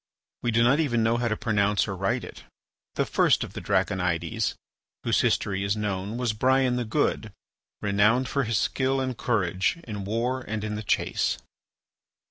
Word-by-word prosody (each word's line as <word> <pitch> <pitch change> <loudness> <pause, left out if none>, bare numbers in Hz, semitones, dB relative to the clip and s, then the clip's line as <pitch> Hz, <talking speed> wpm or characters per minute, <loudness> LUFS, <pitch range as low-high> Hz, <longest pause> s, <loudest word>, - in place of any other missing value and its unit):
We 120 - 0
do 115 0 +3
not 130 +5 +4
even 120 -8 +1
know 115 +1 +2
how 120 0 0
to 110 -2 -1
pronounce 105 -2 +1
or 95 - -3
write 95 +1 -1
it. - - -10 0.5
The - - +1
first - - +3
of - - -8
the - - -6
Draconides 90 -3 0 0.5
whose - - +2
history 100 -1 0
is 100 +2 0
known 105 +1 -3
was 120 -3 0
Brian 130 +3 +2
the 125 -1 -1
Good, 110 - 0 0.5
renowned 105 +5 +3
for 140 +1 0
his 115 -1 0
skill 135 +3 +1
and 130 -1 -2
courage 95 - 0
in 105 -3 -6
war 120 +6 -1
and 110 -3 -4
in 105 0 -3
the 105 - -3
chase. 105 - 0
110 Hz, 175 wpm, -26 LUFS, 100-125 Hz, 0.5 s, not